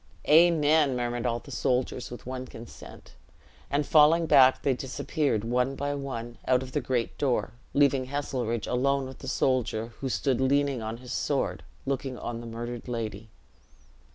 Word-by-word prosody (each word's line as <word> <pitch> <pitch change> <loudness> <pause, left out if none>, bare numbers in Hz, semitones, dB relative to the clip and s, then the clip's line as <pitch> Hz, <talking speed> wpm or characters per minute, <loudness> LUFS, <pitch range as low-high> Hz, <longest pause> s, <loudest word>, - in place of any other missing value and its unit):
"Amen!" 155 -3 +5
murmured 120 0 -2
all 120 -1 0
the - - -12
soldiers, 125 0 -1
with 120 - -9
one 130 0 -5
consent; 115 -1 -12 0.6
and 145 +1 0
falling 160 +3 +5
back, 135 -4 +5
they 135 - +3
disappeared, 130 -2 -1
one 125 +3 0
by 145 +1 -2
one, 120 -4 -5
out 130 0 +3
of 130 - -9
the 145 - -1
great 125 -2 -1
door, 135 -4 0 0.2
leaving 140 -2 +3
Heselrigge 130 -5 -2
alone 135 +2 +1
with 130 0 -10
the - - -9
soldier, 120 -3 0
who 135 - -3
stood 130 0 0
leaning 140 -1 +2
on 110 +1 -4
his 125 0 -8
sword, - - -1 0.2
looking 135 -1 -2
on 115 -1 -5
the 120 - -8
murdered 120 +1 -6
lady. 110 -3 -4
130 Hz, 160 wpm, -27 LUFS, 120-140 Hz, 0.6 s, Amen